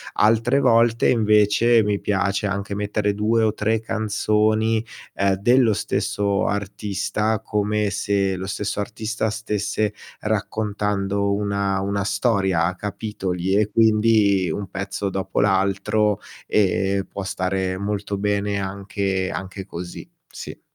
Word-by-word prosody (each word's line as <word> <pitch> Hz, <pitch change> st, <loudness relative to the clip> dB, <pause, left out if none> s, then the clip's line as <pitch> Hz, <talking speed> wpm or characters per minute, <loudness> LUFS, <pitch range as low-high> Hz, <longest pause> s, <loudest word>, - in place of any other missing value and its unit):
altre 115 Hz, +5 st, +3 dB
volte 115 Hz, -3 st, +4 dB
invece 110 Hz, 0 st, +4 dB
mi 105 Hz, -1 st, -1 dB
piace 100 Hz, 0 st, 0 dB
anche 100 Hz, 0 st, -3 dB
mettere 105 Hz, 0 st, -1 dB
2 110 Hz, +2 st, +1 dB
o 110 Hz, -1 st, +2 dB
3 110 Hz, +1 st, 0 dB
canzoni, 110 Hz, +1 st, +1 dB, 0.3 s
ehm, 100 Hz, 0 st, +1 dB
dello 120 Hz, +4 st, +4 dB
stesso 100 Hz, 0 st, -1 dB
artista, 100 Hz, +1 st, -1 dB
come 105 Hz, -1 st, 0 dB
se 100 Hz, -1 st, 0 dB
lo 95 Hz, +1 st, -5 dB
stesso 105 Hz, +1 st, -3 dB
artista 110 Hz, +1 st, -3 dB
stesse 105 Hz, -1 st, -2 dB, 0.3 s
raccontando 100 Hz, -2 st, -1 dB
una 100 Hz, -1 st, 0 dB
una 100 Hz, +1 st, -1 dB
storia 95 Hz, -4 st, +1 dB
a 90 Hz, -, -1 dB
capitoli, 95 Hz, -2 st, -3 dB
e 105 Hz, 0 st, +2 dB
quindi 110 Hz, -4 st, +3 dB
un 100 Hz, +1 st, -4 dB
pezzo 95 Hz, +1 st, -3 dB
dopo 95 Hz, 0 st, -2 dB
l'altro, 100 Hz, +1 st, +2 dB, 0.3 s
e 95 Hz, -1 st, +1 dB
può 100 Hz, -, -5 dB
stare 95 Hz, 0 st, -2 dB
molto 100 Hz, 0 st, -3 dB
bene 100 Hz, 0 st, 0 dB
anche 95 Hz, -1 st, -2 dB
anche 95 Hz, +1 st, -6 dB
così, 90 Hz, 0 st, -8 dB, 0.2 s
sì. -, -, -9 dB
100 Hz, 120 wpm, -22 LUFS, 95-105 Hz, 0.3 s, volte